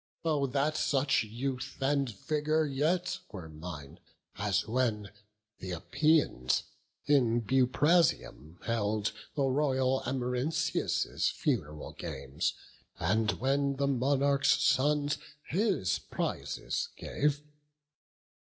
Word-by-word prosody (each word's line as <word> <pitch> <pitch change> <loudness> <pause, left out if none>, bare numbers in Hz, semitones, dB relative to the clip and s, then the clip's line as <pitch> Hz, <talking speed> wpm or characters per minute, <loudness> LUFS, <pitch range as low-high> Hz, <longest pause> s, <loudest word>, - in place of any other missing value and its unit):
Oh 150 -4 +2
that 140 +4 0
such 135 -2 +2
youth 125 +4 -4
and 140 -1 +1
vigour 155 +8 0
yet 170 +6 0
were 90 -6 -7
mine, 75 -2 -9 0.4
As 100 0 0
when 110 -4 0 0.5
th' - - -8
Epeians 105 - +1 0.4
in 125 -5 +3
Buprasium 130 - +2
held 110 -2 0 0.2
The 140 - +1
royal 130 -1 +2
Amarynceus' 130 +5 0
fun'ral 75 +1 -2
games, 65 - -3 0.4
And 110 +5 +1
when 140 +2 0
the 140 +1 0
monarch's 140 +1 +2
sons 145 +1 +2 0.3
his 185 - +1
prizes - - -3
gave! 145 0 -1
135 Hz, 95 wpm, -31 LUFS, 110-145 Hz, 0.5 s, in